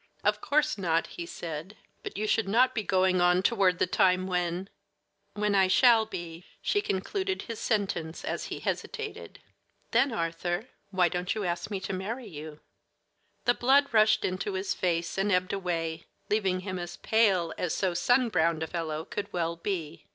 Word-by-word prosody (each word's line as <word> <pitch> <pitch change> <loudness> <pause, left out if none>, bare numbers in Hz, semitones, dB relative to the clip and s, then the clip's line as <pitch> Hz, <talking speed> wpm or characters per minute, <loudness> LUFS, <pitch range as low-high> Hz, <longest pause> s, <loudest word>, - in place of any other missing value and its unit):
"Of - - +2
course 300 -5 +1
not," 165 -3 +1
he 170 - -7
said; 170 +5 -6 0.2
"but - - -7
you 215 - -1
should 215 0 +1
not 245 +5 +4
be 220 - -1
going 185 -2 +2
on 180 +1 +4
toward 185 -2 +3
the - - +2
time 185 +1 +3
when 180 0 -1 0.3
" - - -51 0.3
"When 210 0 +1
I 190 -1 +5
shall 225 +2 +5
be," 175 -4 -7 0.2
she 410 - +1
concluded 380 - -2
his 230 -2 -6
sentence 195 -7 -1
as - - -3
he - - -6
hesitated. 440 -2 -4 0.5
"Then, 275 - +3
Arthur, 175 +4 -2 0.2
why 185 -3 +3
don't 180 +3 -2
you 215 - -2
ask 175 0 -2
me 200 -2 -2
to 190 - -4
marry 220 +7 -4
you?" 150 -2 -9 0.8
The 240 - +5
blood 275 +3 +3
rushed 215 -1 +4
into 185 +2 -2
his 190 +1 -1
face 170 0 -1
and 200 +2 +1
ebbed 180 0 +1
away, 165 -4 -2 0.2
leaving 190 -3 +1
him 185 -1 -4
as 175 0 -6
pale 195 -7 +2
as 180 - -1
so 185 -2 0
sun 245 +7 +3
browned 165 -4 +1
a - - -3
fellow 160 -2 -3
could 205 0 -5
well 170 -1 -1
be. 170 -3 -4
185 Hz, 180 wpm, -28 LUFS, 170-215 Hz, 0.8 s, I